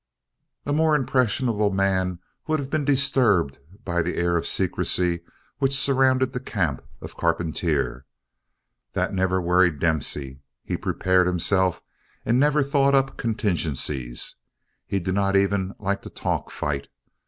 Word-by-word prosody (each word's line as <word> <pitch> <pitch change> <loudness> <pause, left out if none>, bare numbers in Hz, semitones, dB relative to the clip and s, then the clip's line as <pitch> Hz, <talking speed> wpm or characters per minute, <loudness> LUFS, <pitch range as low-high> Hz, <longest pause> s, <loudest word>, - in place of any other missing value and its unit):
A 145 - -1
more 155 0 +3
impressionable 120 -5 +1
man 95 -2 0 0.3
would 155 0 +1
have 140 -2 -5
been 155 - 0
disturbed 130 - +2 0.3
by 85 -2 0
the 85 +2 -2
air 85 0 +1
of 85 - 0
secrecy 90 -1 0 0.4
which 135 0 +2
surrounded 130 -1 +2
the 125 - -2
camp 90 - -2 0.2
of - - -9
Carpentier. 70 -6 -1 0.9
That - - -1
never 95 -1 +1
worried 90 -2 +3
Dempsey. 70 -4 -1 0.2
He - - -3
prepared 95 -1 +1
himself 90 +1 +1 0.4
and 120 +2 +2
never 150 +1 +3
thought 140 0 +3
up 135 0 +1
contingencies. 75 - -2 0.5
He 100 - 0
did 95 +1 -2
not 100 0 +1
even 100 0 +1
like 100 -1 -2
to - - -9
talk - - -3
fight. 70 -2 -3
95 Hz, 135 wpm, -24 LUFS, 85-130 Hz, 0.9 s, more